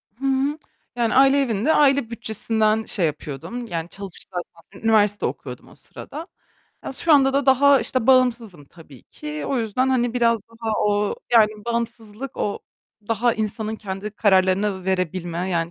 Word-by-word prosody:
Hı 270 - -7
hı. 270 +2 +1 0.4
Yani 235 -2 0
aile 275 +1 +5
evinde 240 +3 +1
aile 275 -4 +3
bütçesinden 220 -1 0
şey 185 - +1
yapıyordum 155 - -5
yani 170 -4 -4
çalış, 195 -3 -6 0.3
zaten 180 +4 -17
üniversite 210 -2 +3
okuyordum - - -6
o - - -17
sırada. 315 +5 -10 0.6
Ya, - - -5
şu 315 +4 +1
anda 270 -2 +5
da 280 0 0
daha 275 +1 +5
işte 255 -2 -1
bağımsızım 235 - +2
tabii 145 -4 -16
ki. 150 0 -7
O 270 - 0
yüzden 235 +3 0
hani 245 -2 +1
biraz 230 -3 +2
daha 230 -1 -5
o, 205 0 +1 0.2
yani 220 -3 +6 0.2
bağımsızlık 235 +1 -4
o 205 - -2 0.5
daha 230 +1 +1
insanın 220 0 -3
kendi 195 0 -6
kararlarını 190 -1 +2
verebilme, 185 -1 -2
yani 170 -1 -1
220 Hz, 155 wpm, -22 LUFS, 190-255 Hz, 0.6 s, yani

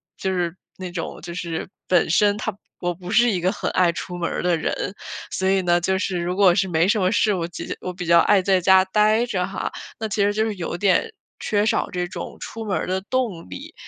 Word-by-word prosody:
就 190 - -2
是 175 -2 -1 0.2
那 185 -1 -6
种 175 -1 -5
就 170 - -7
是 170 -2 -4 0.2
本 180 -2 +3
身 205 +3 +3
她 215 -1 -3 0.2
我 175 0 -1
不 180 +1 -10
是 240 +1 +5
一 185 - 0
个 180 +2 +1
很 - - -3
爱 180 -2 +3
出 180 +1 -6
门 170 -1 -1
儿 - - -3
的 175 -1 +2
人， 160 - -2 0.4
所 190 0 0
以 195 0 +3
呢， 175 -1 +3
就 190 +2 0
是 190 -2 -1
如 175 +1 -2
果 190 -2 +5
是 190 +1 +1
没 165 -2 +2
什 210 +2 +2
么 185 -1 +2
事， 210 0 +3
我 170 -3 -2 0.3
我 180 - -4
比 180 0 -6
较 170 0 +6
爱 195 +3 +4
在 190 0 +3
家 190 +1 +6
呆 215 +4 +3
着 185 -6 -1
哈， 195 - -4 0.3
那 220 - -2
其 210 0 0
实 205 +1 +3
就 215 +1 +1
是 220 -2 -2
有 175 -2 -4
点 205 - +2 0.3
缺 205 0 +1
少 215 - +1
这 180 -1 -2
种 - - -7
出 225 0 -6
门 200 -3 0
儿 - - -2
的 185 +1 0
动 205 - -2
力。 90 - -9
185 Hz, 260 characters per minute, -22 LUFS, 175-205 Hz, 0.4 s, 较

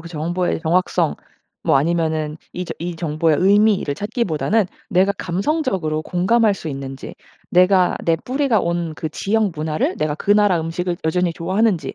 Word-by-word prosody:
그 170 - -10
정보의 175 +2 -2
정확성 170 - +1 0.5
뭐 - - +4
아니면은 155 0 0 0.2
이 180 - -4
저 - - -5
이 175 0 -4
정보의 160 -1 +1
의미를 200 -5 +3
찾기보다는 205 - 0 0.2
내가 195 +1 +3
감성적으로 190 - -1
공감할 205 +6 +2
수 165 - -7
있는지 135 -1 -7 0.4
내가 180 0 +4
내 165 -1 +3
뿌리가 255 - 0
온 170 -2 -2
그 160 - -3
지역 215 -1 0
문화를 155 0 -2
내가 150 -1 -1
그 200 - -3
나라 205 -4 +3
음식을 175 +2 -3
여전히 175 +2 +1
좋아하는지 185 -2 0
175 Hz, 345 characters per minute, -20 LUFS, 160-200 Hz, 0.5 s, 뭐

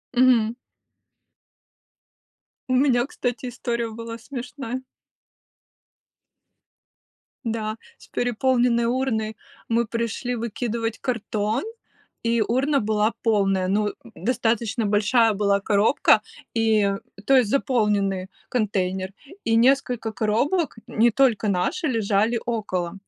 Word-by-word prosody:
Мгм. 240 -3 +4 2.2
У - - +2
меня, 250 -2 +3
кстати, 250 -2 -3
история 235 -1 -3
была 230 +1 -7
смешная. 250 0 -6 2.6
Да, 220 -1 -2 0.2
с - - -17
переполненной 245 0 +1
урной, 230 -3 -1 0.3
мы 230 +1 +2
пришли 235 +2 -2
выкидывать 230 0 -3
картон, 220 -2 -1 0.6
и 230 0 +2
урна 270 +6 +2
была 215 0 +1
полная, 195 -4 +2
ну, 210 +2 +1 0.3
достаточно 230 -2 0
большая 215 +2 +3
была 200 0 +2
коробка, 210 +1 +3 0.3
и, 220 -3 +3 0.3
то 270 - +5
есть 245 -5 +4
заполненный 205 -8 +1 0.2
контейнер, 190 -4 -1 0.3
и 225 - +2
несколько 245 -3 +2
коробок, 250 - 0
не 230 +1 +3
только 230 -5 +2
наши, 300 - 0
лежали 225 -1 +1
около. 185 -7 -2
230 Hz, 95 wpm, -24 LUFS, 210-245 Hz, 2.6 s, то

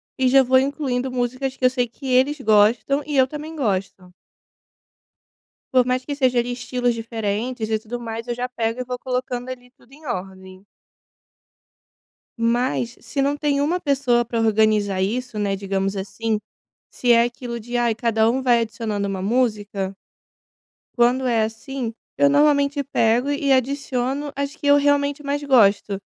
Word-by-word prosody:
e 260 -1 +1
já 265 +1 +6
vou 260 +1 +4
incluindo 265 -2 -2
musicas 255 +2 -2
que 255 - -1
eu - - +7
sei 245 -2 0
que 270 +4 -14
eles 265 +3 +2
gostam 220 +5 +3
e 290 -2 -1
eu 260 - +6
também 305 +3 -7
gosto. 195 -7 -3 1.6
Por 250 -1 +5
mais 255 0 0
que 285 -1 -4
seja 255 -3 +2
ali 245 +1 -3
estilos 245 -1 -1
diferentes 225 +1 -3
e 220 - +1
tudo 240 +3 -7
mais. 230 0 -6
Eu 240 - -2
já 250 +1 -3
pego 230 0 -2
e - - -2
vou 250 0 -5
colocando 250 -1 -3
ali 250 -1 -9
tudo 255 0 -26
em 305 +2 -16
ordem. 190 -4 -7 1.7
Mas 240 +1 0
se 235 +4 -4
não 285 +1 +1
tem 290 -1 0
uma 340 +5 0
pessoa 260 -5 +2
para 230 0 -2
organizar 215 -3 +2
isso, 235 +2 -2
né, 200 -1 0
digamos 195 0 -2
assim, 215 +3 -2 0.5
se 245 -1 +2
é 235 0 +6
aquilo 240 -1 -5
de 240 +2 -4
ai 235 -2 +2
cada 225 -1 +1
um 260 +2 -1
vai 240 -2 +4
adicionando 220 -3 -3
uma 190 -1 -3
música 205 -4 -1 1.0
quando 250 +2 +3
é 230 -3 +2
assim 230 +2 -5 0.3
eu 285 - +5
normalmente 285 0 +3
pego 245 +1 +1
e 285 -1 0
adiciono 270 +1 -1
as 280 +1 -3
que 285 - -7
eu 285 0 +6
realmente 285 0 +1
mais 285 +1 -2
gosto, 210 -7 +3
245 Hz, 165 wpm, -22 LUFS, 225-270 Hz, 1.7 s, eu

